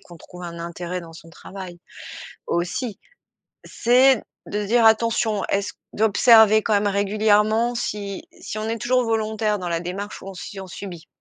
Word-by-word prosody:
qu'on 175 Hz, -, -14 dB
trouve 180 Hz, +2 st, -13 dB
un 170 Hz, -1 st, -7 dB
intérêt 170 Hz, +1 st, -5 dB
dans 165 Hz, -1 st, -12 dB
son 165 Hz, 0 st, -13 dB
travail 185 Hz, 0 st, -10 dB, 0.7 s
aussi. 185 Hz, +5 st, -2 dB, 0.7 s
C'est 255 Hz, +3 st, +4 dB, 0.3 s
de 210 Hz, 0 st, -3 dB
se -, -, -4 dB
dire: 230 Hz, 0 st, +4 dB
«Attention, 220 Hz, -2 st, +2 dB
est-ce 200 Hz, +1 st, -1 dB
q», -, -, -48 dB
d'observer 220 Hz, 0 st, +5 dB
quand 220 Hz, -, -1 dB
même 205 Hz, 0 st, +2 dB
régulièrement 210 Hz, +3 st, +2 dB
si 200 Hz, -4 st, -4 dB, 0.2 s
si -, -, -6 dB
on 215 Hz, -, -3 dB
est 230 Hz, -, -2 dB
toujours 250 Hz, +2 st, +1 dB
volontaire 220 Hz, -2 st, 0 dB
dans 180 Hz, -, -4 dB
la 170 Hz, -1 st, -1 dB
démarche 190 Hz, +4 st, -6 dB
ou 195 Hz, -, -8 dB
on 195 Hz, -, -8 dB
si 195 Hz, +2 st, -8 dB
on 190 Hz, -, -8 dB
subit. 180 Hz, -2 st, -9 dB
205 Hz, 175 wpm, -22 LUFS, 180-220 Hz, 0.7 s, d'observer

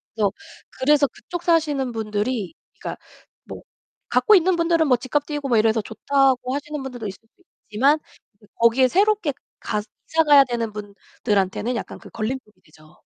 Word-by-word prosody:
그래서 205 Hz, -3 st, +1 dB, 0.5 s
그래서 285 Hz, +1 st, +4 dB
그쪽 350 Hz, +5 st, -8 dB
사시는 295 Hz, -7 st, +1 dB
분들이 215 Hz, -1 st, -3 dB, 0.3 s
그러니까 -, -, -6 dB, 0.4 s
뭐 -, -, -9 dB, 0.5 s
갖고 430 Hz, -3 st, +5 dB
있는 365 Hz, 0 st, +3 dB
분들은 335 Hz, -2 st, +2 dB
뭐 250 Hz, -2 st, +4 dB
집값 275 Hz, +4 st, -2 dB
뛰고 295 Hz, -2 st, -4 dB
뭐 235 Hz, -, +3 dB
이래서 220 Hz, 0 st, +3 dB
좋다고 260 Hz, +3 st, +1 dB
하시는 295 Hz, 0 st, -5 dB
분들도 245 Hz, -5 st, -6 dB
있을 190 Hz, -, -8 dB, 0.2 s
수 365 Hz, -, -30 dB, 0.3 s
있지만 275 Hz, +8 st, +3 dB, 0.4 s
이제 210 Hz, -, -23 dB
거기에 235 Hz, +3 st, +4 dB
새롭게 400 Hz, -, +2 dB, 0.3 s
가 210 Hz, -, -2 dB, 0.3 s
이사 325 Hz, 0 st, +3 dB
가야 285 Hz, -2 st, +8 dB
되는 235 Hz, -3 st, -3 dB
분들한테는 205 Hz, +2 st, -2 dB
약간 -, -, -6 dB
그 -, -, -14 dB
걸림돌이 230 Hz, 0 st, -5 dB
되죠. 155 Hz, 0 st, -21 dB
255 Hz, 365 characters per minute, -22 LUFS, 220-295 Hz, 0.5 s, 가야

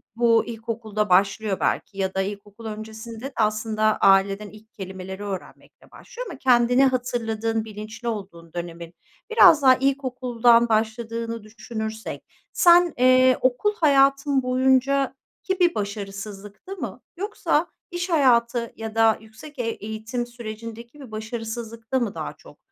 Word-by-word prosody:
bu 230 Hz, -1 st, +3 dB
ilkokulda 220 Hz, -2 st, -3 dB
başlıyor 195 Hz, +2 st, +2 dB
belki 195 Hz, -, -1 dB
ya 190 Hz, -1 st, -1 dB
da 190 Hz, -, 0 dB
ilkokul 205 Hz, +3 st, -7 dB
öncesinde 220 Hz, +1 st, -8 dB
de 270 Hz, -, -6 dB
aslında 215 Hz, 0 st, +1 dB
aileden 195 Hz, +1 st, +3 dB
ilk 215 Hz, +2 st, -17 dB
kelimeleri 190 Hz, -1 st, -7 dB
öğrenmekle 195 Hz, -3 st, -9 dB
başlıyor -, -, -9 dB
ama -, -, -8 dB
kendini 245 Hz, 0 st, +4 dB
hatırladığın, 225 Hz, -3 st, -1 dB
bilinçli 215 Hz, +2 st, -8 dB
olduğun 190 Hz, -7 st, -6 dB
dönemin 170 Hz, -1 st, -7 dB, 0.4 s
biraz 360 Hz, -9 st, +7 dB
daha 260 Hz, -2 st, +7 dB
ilkokuldan 250 Hz, -3 st, +2 dB
başladığını 230 Hz, +1 st, -2 dB
düşünürsek 220 Hz, 0 st, -6 dB, 0.3 s
sen, 345 Hz, -1 st, +5 dB
eee, 255 Hz, +1 st, +5 dB
okul 255 Hz, +12 st, +1 dB
hayatın 275 Hz, -3 st, +3 dB
boyunca 265 Hz, +2 st, +2 dB, 0.3 s
ki 380 Hz, 0 st, -2 dB
bir 350 Hz, -1 st, +3 dB
başarısızlıkta 200 Hz, -, -6 dB
mı -, -, -6 dB, 0.2 s
yoksa 410 Hz, +3 st, 0 dB, 0.2 s
iş 350 Hz, +1 st, -3 dB
hayatı 240 Hz, -6 st, +2 dB
ya 225 Hz, 0 st, -7 dB
da 225 Hz, -1 st, +4 dB
yüksek 230 Hz, +7 st, -14 dB
e -, -, 0 dB
eğitim 225 Hz, +2 st, -4 dB
sürecindeki 230 Hz, +2 st, -9 dB
bir 265 Hz, -5 st, -11 dB
başarısızlıkta 225 Hz, +2 st, -4 dB
mı 230 Hz, -5 st, -2 dB
daha -, -, -5 dB
çok -, -, -17 dB
230 Hz, 130 wpm, -24 LUFS, 215-255 Hz, 0.4 s, biraz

